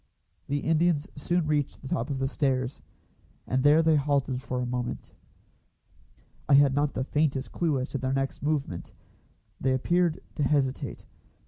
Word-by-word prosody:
The 145 Hz, 0 st, -1 dB
Indians 160 Hz, -1 st, +2 dB
soon 170 Hz, +3 st, 0 dB
reached 150 Hz, -2 st, 0 dB
the -, -, -6 dB
top 115 Hz, -2 st, -2 dB
of 140 Hz, -, -2 dB
the 135 Hz, 0 st, 0 dB
stairs, 135 Hz, -2 st, -1 dB, 0.6 s
and 130 Hz, +1 st, 0 dB
there 150 Hz, +3 st, +6 dB
they 160 Hz, -1 st, +4 dB
halted 140 Hz, -3 st, 0 dB
for 130 Hz, -1 st, -3 dB
a 125 Hz, -, -1 dB
moment. 125 Hz, 0 st, -4 dB, 1.4 s
I 140 Hz, -, +7 dB
had 140 Hz, -1 st, +6 dB
not 145 Hz, +1 st, 0 dB
the 130 Hz, -, 0 dB
faintest 140 Hz, -1 st, 0 dB
clue 155 Hz, -6 st, 0 dB
as 130 Hz, -, -3 dB
to 140 Hz, -, -2 dB
their 130 Hz, +1 st, -1 dB
next 135 Hz, 0 st, -2 dB
movement. 140 Hz, -, -2 dB, 0.7 s
They 130 Hz, 0 st, +1 dB
appeared 170 Hz, +5 st, +1 dB, 0.2 s
to -, -, -1 dB
hesitate. 135 Hz, -2 st, 0 dB
140 Hz, 160 wpm, -27 LUFS, 130-150 Hz, 1.4 s, I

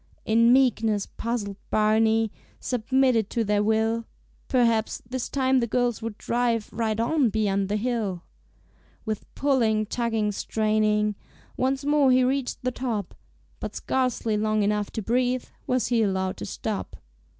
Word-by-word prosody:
In 230 Hz, +2 st, +4 dB
meekness 225 Hz, -5 st, +3 dB
puzzled 220 Hz, -4 st, -4 dB
Barney 220 Hz, +1 st, +3 dB, 0.3 s
Submitted 250 Hz, -2 st, +1 dB
to 235 Hz, -, 0 dB
their 210 Hz, -1 st, +1 dB
will. 220 Hz, +2 st, +1 dB, 0.4 s
Perhaps 230 Hz, -4 st, +1 dB
this 255 Hz, 0 st, -4 dB
time 265 Hz, -1 st, +2 dB
the 235 Hz, -, 0 dB
girls 245 Hz, 0 st, 0 dB
would 225 Hz, -2 st, -5 dB
drive 235 Hz, -2 st, -1 dB
Right 225 Hz, -1 st, -1 dB
on 255 Hz, +2 st, +2 dB
beyond 200 Hz, -2 st, 0 dB
the 205 Hz, -, 0 dB
hill. 215 Hz, -6 st, -2 dB, 0.8 s
With 215 Hz, -2 st, -4 dB
pulling, 230 Hz, -6 st, +2 dB
tugging, 225 Hz, -2 st, -1 dB
straining, 215 Hz, 0 st, +1 dB, 0.4 s
Once 265 Hz, +2 st, -1 dB
more 290 Hz, -2 st, +4 dB
he 255 Hz, 0 st, +5 dB
reached 265 Hz, 0 st, -1 dB
the 255 Hz, -, 0 dB
top, 230 Hz, -7 st, -3 dB, 0.5 s
But -, -, -6 dB
scarcely 250 Hz, -4 st, 0 dB
long 215 Hz, 0 st, +1 dB
enough 210 Hz, 0 st, 0 dB
to 220 Hz, -, -3 dB
breathe 250 Hz, +3 st, 0 dB, 0.2 s
Was 255 Hz, -1 st, +1 dB
he 235 Hz, -2 st, +2 dB
allowed 190 Hz, -2 st, 0 dB
to -, -, -6 dB
stop. 215 Hz, -3 st, -4 dB
225 Hz, 140 wpm, -25 LUFS, 215-250 Hz, 0.8 s, he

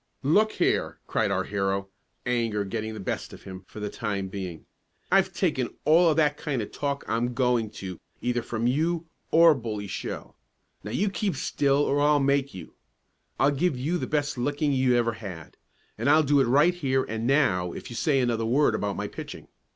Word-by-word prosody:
"Look 210 Hz, +10 st, +3 dB
here!" -, -, 0 dB
cried -, -, 0 dB
our -, -, 0 dB
hero, 95 Hz, -1 st, -2 dB, 0.4 s
anger 115 Hz, -4 st, 0 dB
getting 110 Hz, +2 st, -4 dB
the -, -, -7 dB
best 95 Hz, -, -4 dB
of -, -, -12 dB
him 95 Hz, -1 st, -9 dB
for -, -, -10 dB
the 105 Hz, -, -3 dB
time 100 Hz, -3 st, -3 dB
being. 95 Hz, -4 st, -6 dB, 0.5 s
"I've -, -, +4 dB
taken -, -, -1 dB
all 165 Hz, +3 st, +6 dB
of 155 Hz, -, +1 dB
that 150 Hz, -2 st, +3 dB
kind 140 Hz, -4 st, -2 dB
of -, -, -9 dB
talk 140 Hz, -1 st, -3 dB
I'm 120 Hz, +2 st, -1 dB
going 125 Hz, -4 st, +1 dB, 0.2 s
to 90 Hz, -3 st, -6 dB, 0.2 s
either 120 Hz, 0 st, -1 dB
from 115 Hz, 0 st, -3 dB
you 160 Hz, +6 st, +1 dB, 0.2 s
or 165 Hz, 0 st, +7 dB
Bully 110 Hz, -6 st, -4 dB
Shell! 95 Hz, -, -6 dB, 0.5 s
Now 105 Hz, -, -6 dB
you 195 Hz, -, 0 dB
keep 200 Hz, -4 st, -1 dB
still 140 Hz, +1 st, +1 dB
or 145 Hz, -, +1 dB
I'll 145 Hz, 0 st, +4 dB
make 140 Hz, 0 st, +1 dB
you. 95 Hz, -, -10 dB, 0.7 s
I'll 140 Hz, +2 st, +4 dB
give 145 Hz, +1 st, 0 dB
you 160 Hz, +8 st, -1 dB
the -, -, -3 dB
best 145 Hz, -3 st, -1 dB
licking 145 Hz, +3 st, 0 dB
you 130 Hz, -2 st, +3 dB
ever 120 Hz, -1 st, +2 dB
had; 95 Hz, -8 st, -9 dB, 0.4 s
and -, -, +1 dB
I'll 155 Hz, 0 st, +6 dB
do 145 Hz, 0 st, +3 dB
it 135 Hz, -, +4 dB
right 145 Hz, +9 st, +4 dB
here 135 Hz, -6 st, 0 dB
and 110 Hz, +1 st, -3 dB
now 105 Hz, -, +2 dB
if -, -, -8 dB
you -, -, -6 dB
say 140 Hz, +2 st, +2 dB
another 120 Hz, -3 st, 0 dB
word 130 Hz, +6 st, +3 dB
about 100 Hz, -1 st, -1 dB
my -, -, -2 dB
pitching! -, -, -9 dB
125 Hz, 195 wpm, -26 LUFS, 110-145 Hz, 0.7 s, or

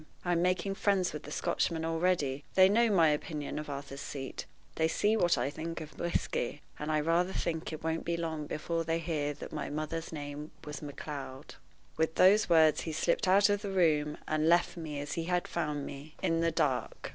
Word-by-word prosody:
I'm 175 Hz, -1 st, +2 dB
making 185 Hz, +2 st, +1 dB
friends 195 Hz, -3 st, +1 dB
with 150 Hz, -, -5 dB
the 150 Hz, -, -10 dB
Scotchmen 160 Hz, +1 st, 0 dB
already. 165 Hz, -5 st, 0 dB
They 185 Hz, 0 st, +8 dB
know 230 Hz, +3 st, +4 dB
my 170 Hz, -6 st, +5 dB
opinion 150 Hz, 0 st, -2 dB
of 150 Hz, -, -6 dB
Arthur's 140 Hz, 0 st, -6 dB
Seat; 135 Hz, -2 st, -6 dB, 0.3 s
they 160 Hz, -, +2 dB
see 210 Hz, +6 st, +2 dB
what 175 Hz, -8 st, +3 dB
I 125 Hz, +3 st, 0 dB
think 165 Hz, +3 st, -5 dB
of 155 Hz, -1 st, -10 dB
whisky; 150 Hz, -4 st, -2 dB, 0.2 s
and 150 Hz, +1 st, -2 dB
I 155 Hz, -, +2 dB
rather 170 Hz, +4 st, +1 dB
think 165 Hz, -1 st, -2 dB
it 155 Hz, -1 st, -7 dB
won't 160 Hz, 0 st, -1 dB
be 170 Hz, 0 st, -1 dB
long 160 Hz, -3 st, -3 dB
before 165 Hz, +2 st, -2 dB
they 165 Hz, 0 st, 0 dB
hear 155 Hz, -3 st, -1 dB
that 145 Hz, -, -9 dB
my 150 Hz, -, -3 dB
mother's 155 Hz, +2 st, -4 dB
maiden 145 Hz, -2 st, -5 dB
name 150 Hz, -, -9 dB
was 150 Hz, 0 st, -6 dB
Macleod." 145 Hz, -2 st, -7 dB, 0.4 s
With 160 Hz, 0 st, +1 dB
those 200 Hz, +3 st, +5 dB
words 160 Hz, -2 st, +5 dB
he 165 Hz, -, -4 dB
slipped 170 Hz, +4 st, +1 dB
out 195 Hz, +3 st, +6 dB
of 205 Hz, 0 st, +1 dB
the 200 Hz, -, -4 dB
room, 155 Hz, -5 st, +2 dB
and 155 Hz, +1 st, +2 dB
left 175 Hz, +1 st, +3 dB
me, 155 Hz, -4 st, -5 dB
as 145 Hz, 0 st, -4 dB
he 165 Hz, -, -2 dB
had 180 Hz, 0 st, 0 dB
found 150 Hz, -4 st, -2 dB
me, 145 Hz, +3 st, -9 dB
in 165 Hz, 0 st, +2 dB
the 165 Hz, -, +3 dB
dark. 145 Hz, -5 st, -1 dB
160 Hz, 205 wpm, -31 LUFS, 150-175 Hz, 0.4 s, They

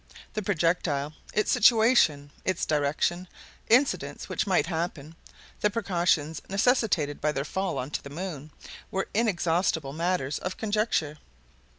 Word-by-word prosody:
The 215 Hz, -, -2 dB
projectile, 165 Hz, -6 st, 0 dB, 0.2 s
its 210 Hz, -, +1 dB
situation, 220 Hz, -, +4 dB
its 185 Hz, -2 st, 0 dB
direction, 155 Hz, +4 st, 0 dB, 0.4 s
incidents 255 Hz, +5 st, +2 dB
which -, -, -1 dB
might 185 Hz, -2 st, +3 dB
happen, 165 Hz, -2 st, -4 dB, 0.4 s
the 210 Hz, -, +2 dB
precautions 170 Hz, -7 st, 0 dB
necessitated 195 Hz, -, +1 dB
by 150 Hz, -, +2 dB
their 140 Hz, -1 st, -3 dB
fall 190 Hz, -1 st, -2 dB
on 130 Hz, +2 st, -4 dB
to -, -, -3 dB
the 140 Hz, -, -8 dB
moon, 155 Hz, -2 st, -6 dB, 0.4 s
were 190 Hz, -, -2 dB
inexhaustible 175 Hz, -8 st, +1 dB
matters 165 Hz, -4 st, -1 dB
of 185 Hz, -, -5 dB
conjecture. 205 Hz, -9 st, -1 dB
175 Hz, 125 wpm, -27 LUFS, 150-200 Hz, 0.4 s, situation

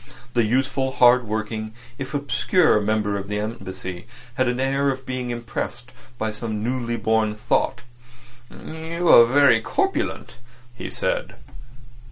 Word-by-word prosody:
The 120 Hz, -, +3 dB
useful, 130 Hz, +3 st, 0 dB
hard 125 Hz, -1 st, +5 dB
working, 110 Hz, 0 st, -4 dB, 0.2 s
if 135 Hz, +2 st, -5 dB
obscure 145 Hz, -, +2 dB
member 105 Hz, -1 st, 0 dB
of 100 Hz, -, -7 dB
the 105 Hz, 0 st, -2 dB
Embassy 95 Hz, -3 st, -6 dB, 0.3 s
had 130 Hz, 0 st, +1 dB
an 125 Hz, +1 st, -1 dB
air 135 Hz, +1 st, +1 dB
of 130 Hz, -1 st, -4 dB
being 130 Hz, -1 st, -4 dB
impressed 120 Hz, +1 st, -5 dB, 0.3 s
by 110 Hz, -1 st, -2 dB
some 110 Hz, -1 st, -4 dB
newly 120 Hz, -1 st, -2 dB
born 110 Hz, -2 st, +1 dB
thought. 120 Hz, +3 st, 0 dB, 0.7 s
"You 165 Hz, +2 st, -5 dB
are 115 Hz, -, +9 dB
very 130 Hz, -2 st, +5 dB
corpulent," 390 Hz, -, -2 dB, 0.4 s
he 120 Hz, -, -7 dB
said. -, -, -2 dB
120 Hz, 135 wpm, -23 LUFS, 110-135 Hz, 0.7 s, are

